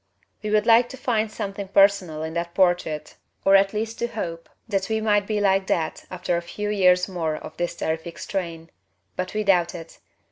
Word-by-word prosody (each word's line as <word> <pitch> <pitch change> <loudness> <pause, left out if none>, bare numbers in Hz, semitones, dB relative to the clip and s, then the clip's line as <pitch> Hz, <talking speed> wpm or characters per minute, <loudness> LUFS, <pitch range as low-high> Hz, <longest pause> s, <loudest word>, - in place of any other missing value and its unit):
We 215 - -3
would 210 0 +2
like 235 +1 +5
to 265 - -9
find 225 -4 0
something 200 -1 -5
personal 195 -5 +3
in 160 0 -4
that 170 0 -3
portrait 175 -5 +1 0.3
or 195 - +6
at 195 0 +5
least 220 +1 -3
to 235 - 0
hope 170 -8 -5 0.2
that 195 -2 -1
we 220 0 +1
might 205 -2 +2
be 215 -1 0
like 195 -1 +2
that 160 -2 -1
after 180 -1 -2
a - - -2
few 210 +4 -4
years 180 -3 +4
more 165 -5 -2
of - - -9
this 175 0 -2
terrific 160 +1 -3
strain. 165 -4 -5 0.4
But 185 +3 -4
we 215 - 0
doubt 180 -4 +2
it. 165 -1 -10
195 Hz, 200 wpm, -24 LUFS, 170-210 Hz, 0.4 s, or